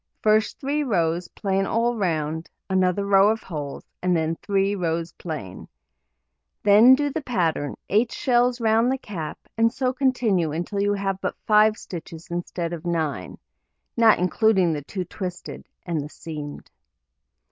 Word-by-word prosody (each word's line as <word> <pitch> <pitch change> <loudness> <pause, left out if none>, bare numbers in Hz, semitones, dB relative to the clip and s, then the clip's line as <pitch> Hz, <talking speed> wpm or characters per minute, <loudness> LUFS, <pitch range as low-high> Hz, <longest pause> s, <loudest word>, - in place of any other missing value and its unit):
First 215 0 +2
3 290 +2 0
rows 175 - 0
plain 195 -1 -1
all 235 +1 +1
round, 160 -5 -2 0.2
another 185 +1 +2
row 200 0 +5
of 220 0 -1
holes, 145 -5 -6 0.2
and 180 -1 +2
then 160 0 0
3 195 0 +1
rows 170 -2 -2
plain. 145 - -7 1.0
Then 220 +6 +8
do 290 +1 -1
the 320 - -3
pattern 165 - -1
8 225 +4 +2
shells 245 0 +2
round 225 +2 +3
the 265 - 0
cap, 180 - -6 0.2
and 230 0 +4
so 255 +1 -1
continue 240 - +1
until 175 +5 -2
you 205 0 +2
have 195 -1 -2
but - - -2
5 215 0 +5
stitches 165 -2 -9
instead 175 0 -3
of 170 -2 -6
9 160 - -2 0.6
(not 225 -2 +6
including 185 -1 +2
the 150 - -3
2 185 +6 -5
twisted, 180 0 -7 0.2
and 165 -4 -1
the 145 - -7
seamed). 150 -2 -8
190 Hz, 150 wpm, -24 LUFS, 165-220 Hz, 1.0 s, Then